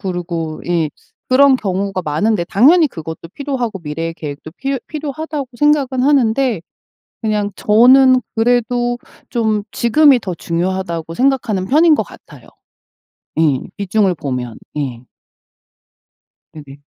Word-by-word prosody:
그리고 170 -4 -4
예 170 -3 0 0.4
그런 275 +1 +5
경우가 195 -3 -2
많은데 190 +6 0
당연히 295 - +4
그것도 160 - -8
필요하고 255 -7 -3
미래의 165 +1 -4
계획도 150 -1 -8
필요 275 0 -2
필요하다고 305 -2 -5
생각은 280 -4 +2
하는데 260 - +2 0.6
그냥 210 -2 0
저는 255 +4 +5
그래도 245 +1 +1 0.3
좀 220 -3 0
지금이 270 +2 +4
더 185 -5 -4
중요하다고 170 -1 -3
생각하는 240 -6 0
편인 310 - +5
것 - - 0
같아요. - - -16 0.9
예. 150 -5 +3 0.2
비중을 200 -1 +1
보면. 125 -6 -5 0.2
예. 125 -4 -4 1.5
네네. 145 -3 -11
215 Hz, 275 characters per minute, -17 LUFS, 165-260 Hz, 1.5 s, 그런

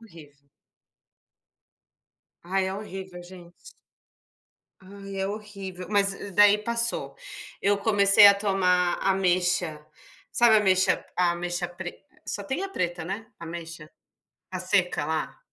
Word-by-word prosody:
horrível. 145 -9 -17 2.0
Ai 190 +2 -1
é 190 - -3
horrível 190 -3 -8
gente. 175 -1 -15 1.2
Ai 195 0 -9
é 190 - -1
horrível, 195 -3 -8
mas 200 -1 +2 0.3
daí 205 0 +6
passou, 235 +2 -1 0.5
eu 200 +1 +2
comecei 200 -1 +6
a 200 - +7
tomar 185 -3 +1
ameixa, 180 -4 0 0.5
sabe, 235 -2 +5
ameixa, 190 -3 +2
ameixa 175 0 -1
pre 175 0 -9 0.2
só 205 - -4
tem 265 - -3
a 390 - -3
preta, 175 - -3
né, 200 +5 -5
ameixa 165 -1 -8 0.6
a - - -4
seca - - 0
lá. - - -3
190 Hz, 110 wpm, -26 LUFS, 175-205 Hz, 2.0 s, a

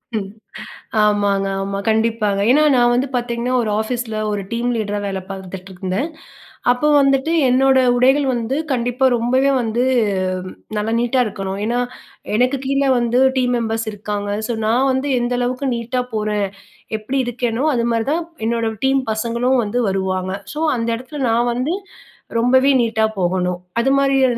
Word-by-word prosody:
ம், 200 -2 -2 0.8
ஆமாங்க. 205 -2 +2
ஆமா 195 0 -3
கண்டிப்பாங்க, 220 -2 +1
ஏனா 300 +4 +5
நான் 240 0 +4
வந்து 255 +3 +1
பாத்தீங்கன்னா, 240 0 -1
ஒரு 215 - -2
ஆஃபீஸ்ல 230 0 -3 0.2
ஒரு 205 -1 -2
டீம் 235 +1 -1
லீடரா 205 -1 -2
வேல 195 -1 -3
பாத்துட்டு 190 0 -8
இருந்தேன், 190 - -2 0.6
அப்ப 250 +5 0
வந்துட்டு 275 +3 +2 0.2
என்னோட 265 +1 +4 0.2
உடைகள் 270 +3 +3
வந்து 240 +3 -2 0.2
கண்டிப்பா 245 +1 0
ரொம்பவே 255 +4 +2
வந்து, 235 +1 0 0.9
நல்லா 215 +2 -1
நீட்டா 245 +2 +1
இருக்கணும். 195 -1 -4
ஏனா, 240 +3 0 0.6
எனக்கு 250 +4 +2
கீழ 275 +1 +1 0.2
வந்து, 240 +1 +1 0.2
டீம் 250 -1 +2
மெம்பர்ஸ் 225 0 -2
இருக்காங்க. 205 0 -4 0.2
ஸோ 235 - -1
நான் 250 +5 +2
வந்து 265 +2 -1
எந்த 240 +1 -1
அளவுக்கு 250 +2 -1
நீட்டா 240 +2 -2
போறேன், 210 -1 0 0.5
எப்டி 255 +6 -2
இருக்கேனோ, 245 +2 -1
அதுமாதிரி 235 -1 0
தான் 335 +2 0 0.2
என்னோட 230 -1 0 0.2
டீம் 270 0 +3
பசங்களும் 235 +3 +1
வந்து 220 +4 -1
வருவாங்க. 190 -1 -1 0.2
ஸோ 300 - -4 0.2
அந்த 230 0 -2
இடத்துல 275 +4 -8
நான் 235 +2 +2
வந்து 255 +8 -1 0.7
ரொம்பவே 260 +3 +4
நீட்டா 220 -1 +1
போகணும், 180 0 0 0.2
அதுமாதிரியான 270 -2 +3
235 Hz, 145 wpm, -19 LUFS, 210-255 Hz, 0.9 s, ஏனா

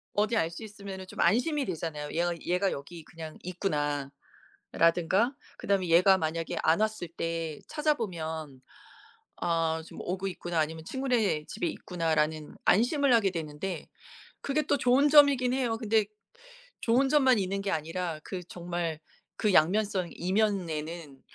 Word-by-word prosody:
어디 215 +2 +2
알 165 -4 +1
수 170 +6 -8
있으면은 200 -3 -8
좀 - - -8
안심이 260 - +2
되잖아요. 160 -4 -4
얘가 175 +1 0
'얘가 180 +2 +1
여기 155 +3 -8
그냥 160 -2 -9
있구나.' 145 -6 -2 0.6
아 - - -8
라든가 180 - +3 0.2
그다음에 195 -3 0
얘가 185 +3 +6
만약에 165 -1 -2
안 160 +1 +4
왔을 215 -5 -1
때 165 -2 -4
찾아보면 165 - -2 0.8
'아 165 -2 0
좀 - - -11
오고 190 +2 -3
있구나.' 175 -3 -3
아니면 160 +1 -2
'친구네 240 - 0
집에 175 - -3
있구나.'라는 155 -3 -1
안심을 260 - +4
하게 205 -5 +4
되는데 160 +1 -5 0.5
그게 295 +2 0
또 285 - +1
좋은 260 +4 +4
점이긴 280 -4 +6
해요. 250 -3 0
근데 220 -2 +1 0.7
좋은 255 +4 +2
점만 265 -5 +4
있는 195 +1 -1
게 195 - -2
아니라 165 +1 -3
그 185 -2 -5
정말 170 -3 -4 0.4
그 210 -3 +1
양면성 185 +2 +3
이면에는 170 -7 -2
180 Hz, 305 characters per minute, -29 LUFS, 160-220 Hz, 0.8 s, 얘가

